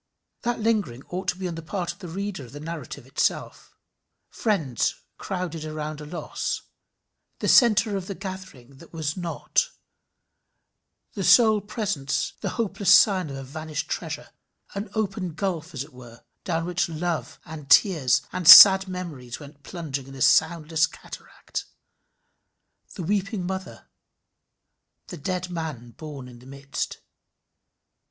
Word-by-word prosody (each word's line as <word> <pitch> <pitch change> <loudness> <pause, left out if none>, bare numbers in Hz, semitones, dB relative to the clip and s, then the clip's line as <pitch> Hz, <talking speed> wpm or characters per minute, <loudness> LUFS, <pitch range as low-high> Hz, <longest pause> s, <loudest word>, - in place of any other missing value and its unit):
That 240 -1 -1
lingering 210 - 0
ought 185 +1 -5
to 180 - +1
be 185 -1 -3
on 175 - -4
the 165 - -6
part 175 +1 -3
of - - -24
the 180 - -8
reader 190 -1 -4
of 125 - -13
the 145 - -8
narrative 155 -4 -7
itself. 130 - -2 0.5
Friends 160 - 0 0.2
crowded 180 -4 -4
around 155 -1 -5
a 150 - -8
loss 170 +3 -4 0.7
the - - -3
centre 220 -3 +5
of 190 -2 -4
the 200 - -5
gathering 185 - -9
that 165 - -14
which - - -34
was 155 -2 -2
not 180 - -1 1.4
the - - -3
sole 220 -3 +6
presence 200 - -2
the - - -2
hopeless 195 -4 +1
sign 195 -4 +6
of 135 - -6
a 135 - -6
vanished 155 +2 -5
treasure - - -5 0.4
an 200 +1 -5
open 195 -5 -2
gulf, 170 -2 -3
as 135 -2 -4
it 145 0 -17
were, 120 -2 -14 0.2
down 165 -3 -1
which 180 0 -1
love 160 -4 -3
and 155 -3 -9
tears 155 - +5
and 180 -2 -3
sad 190 +2 +11
memories 160 -10 -6
went 145 -1 -13
plunging 140 -4 -6
in 135 - -11
a 135 - -9
soundless 160 +3 +3
cataract: - - -8 1.3
the 180 - -5
weeping 195 +1 -1
mother 190 +1 -6 1.2
the 175 - -7
dead 180 +3 -3
man 155 -9 -5
borne 145 -1 -9
in 120 -1 -13
the 125 - -16
midst. 140 0 -5
165 Hz, 145 wpm, -25 LUFS, 145-190 Hz, 1.4 s, sad